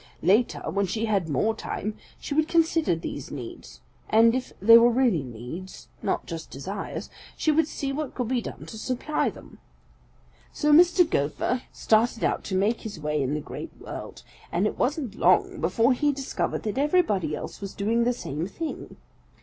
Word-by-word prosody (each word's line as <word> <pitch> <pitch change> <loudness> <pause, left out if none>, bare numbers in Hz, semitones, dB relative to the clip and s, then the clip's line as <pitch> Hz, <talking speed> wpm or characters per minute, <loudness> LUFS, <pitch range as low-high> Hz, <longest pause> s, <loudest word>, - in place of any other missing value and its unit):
Later, 205 +8 +3
when 200 0 0
she 220 +5 -1
had 200 -7 0
more 210 - +1
time, 215 -1 -4 0.2
she - - -5
would 310 +1 +2
consider 325 - +2
these 145 -4 -6
needs, 125 -5 -9 0.3
and 230 +1 +6
if 255 0 -2
they 230 +4 +8
were 235 +1 +8
real 235 - +2
needs, 125 +10 -8
not - - -1
just 165 -2 -7
desires, 195 +9 -6 0.3
she 310 - +2
would 310 0 +3
see 275 -3 -3
what 295 0 -4
could 250 -3 -2
be 250 0 0
done - - -8
to 220 - -9
supply 255 +6 -1
them. - - -13 0.9
"So 300 0 +1
Mr. 350 +2 +6
Gopher 200 - 0
started 225 +1 +2
out - - +1
to 190 - -2
make 210 +5 +1
his 210 -7 -7
way 150 -1 -1
in 135 +2 0
the 150 - -2
Great - - -8
World, - - -8 0.3
and 175 +4 +1
it - - -2
wasn't 270 - 0
long 180 -2 +3
before 225 +10 +3
he 290 +3 +2
discovered 275 -1 -3
that 220 +4 -2
everybody 215 - +2
else - - -7
was 195 -1 -6
doing 225 +4 +1
the 245 - +2
same 160 - -4
thing. 320 +10 -6
225 Hz, 180 wpm, -26 LUFS, 180-265 Hz, 0.9 s, they